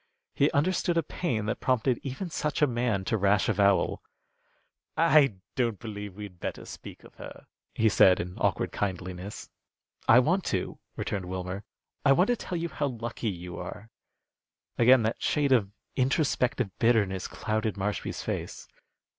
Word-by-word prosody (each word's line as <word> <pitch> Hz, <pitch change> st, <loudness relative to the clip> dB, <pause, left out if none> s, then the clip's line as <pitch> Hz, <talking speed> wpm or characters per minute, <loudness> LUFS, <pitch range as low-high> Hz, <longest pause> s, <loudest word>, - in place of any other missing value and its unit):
He 145 Hz, -, +3 dB
understood 175 Hz, +3 st, +1 dB
a 165 Hz, -, +3 dB
pain 120 Hz, -, -2 dB
that 105 Hz, -, -2 dB
prompted 130 Hz, -1 st, +1 dB
even 135 Hz, +7 st, -4 dB
such 150 Hz, -1 st, -1 dB
a -, -, +8 dB
man 120 Hz, -6 st, -1 dB
to 110 Hz, -, +1 dB
rash 100 Hz, 0 st, +3 dB
avowal. 100 Hz, -2 st, +2 dB, 1.0 s
"I 155 Hz, -8 st, +5 dB, 0.2 s
don't 120 Hz, -5 st, 0 dB
believe 105 Hz, -3 st, -7 dB
we'd 100 Hz, -4 st, -9 dB
better -, -, -5 dB
speak -, -, -10 dB
of -, -, -15 dB
her," -, -, -10 dB, 0.3 s
he 110 Hz, -, +3 dB
said, 95 Hz, -3 st, +6 dB
in 90 Hz, +1 st, -4 dB
awkward -, -, 0 dB
kindliness. 95 Hz, +1 st, -4 dB, 0.6 s
"I 115 Hz, -, +8 dB
want 175 Hz, +9 st, +3 dB
to," 95 Hz, -, -2 dB, 0.2 s
returned 95 Hz, -3 st, -3 dB
Wilmer. 95 Hz, +2 st, -5 dB, 0.4 s
"I 140 Hz, -, +6 dB
want 180 Hz, -, +3 dB
to 245 Hz, -, +3 dB
tell 180 Hz, -5 st, -5 dB
you 170 Hz, 0 st, -2 dB
how 145 Hz, -, -1 dB
lucky 120 Hz, -2 st, -4 dB
you 90 Hz, -2 st, -6 dB
are." 105 Hz, +5 st, -8 dB, 0.8 s
Again 125 Hz, 0 st, +6 dB
that 110 Hz, +2 st, -1 dB
shade 145 Hz, -2 st, +1 dB
of 105 Hz, -7 st, +3 dB, 0.2 s
introspective 130 Hz, -, +1 dB
bitterness 105 Hz, -6 st, +2 dB
clouded 110 Hz, -2 st, -2 dB
Marshby's 100 Hz, +1 st, -3 dB
face. -, -, -4 dB
110 Hz, 155 wpm, -28 LUFS, 100-135 Hz, 1.0 s, a